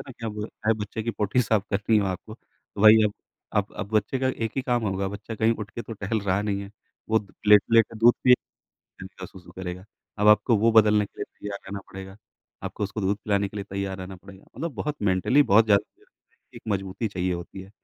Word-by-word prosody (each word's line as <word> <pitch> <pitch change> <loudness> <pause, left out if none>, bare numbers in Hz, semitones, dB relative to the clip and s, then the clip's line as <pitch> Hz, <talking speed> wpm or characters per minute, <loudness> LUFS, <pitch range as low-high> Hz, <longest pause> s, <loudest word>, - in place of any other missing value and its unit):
है 120 -4 -7
कि 105 +1 -2
बच्चे 105 +2 -4
की 115 - -1
पोटी 105 +2 0
साफ़ 110 -3 +1
करनी 105 +2 +2
है - - +1
आपको। 95 +4 -5 0.5
वही 110 +1 +8
अब 105 - +1 0.4
आप - - 0
अब - - -4
बच्चे 110 +5 +1
का 130 - 0 0.2
एक 110 - -3
ही 135 - 0
काम 125 -2 0
होगा 95 0 -1
बच्चा 100 +3 -7
कहीं 110 +1 +2
उठ 105 -2 -7
के 120 - -6
तो 115 - -8
टहल 105 +1 -2
रहा 95 0 0
नहीं 100 -2 -1
है। 100 - -10 0.4
वो 110 0 +4 0.3
लेटे-लेटे 115 +2 +5
दूध 120 +2 +6
पिएगा 125 -1 +3 0.5
एंड 95 - -7
क्या 95 0 -9
सु-सु 90 0 -15
करेगा। 90 0 -6 0.3
अब 105 +1 +4
आपको 105 +2 +5
वो 115 +3 +3
बदलने 105 -1 +5
के - - -27
लिए - - -1 0.2
तैयार 100 -1 -5
रहना 100 +1 -5
पड़ेगा। 95 0 -9 0.5
आपको - - -4
उसको 100 +2 -5
दूध 100 +1 +1
पिलाने 100 -1 +1
के 105 - -11
लिए 100 - -4
तैयार 100 -1 -3
रहना 95 +1 -7
पड़ेगा। 95 +1 -15
मतलब 165 +4 -4
बहुत 150 +5 -3
मेंटली 95 +10 +3
बहुत 110 +3 +7
ज़्यादा 100 -2 +1 0.5
एक - - -11
मजबूती 100 +2 -2
चाहिए 95 -2 -2
होती 85 +2 -7
है। 95 +1 -12
105 Hz, 215 wpm, -25 LUFS, 95-110 Hz, 0.5 s, वही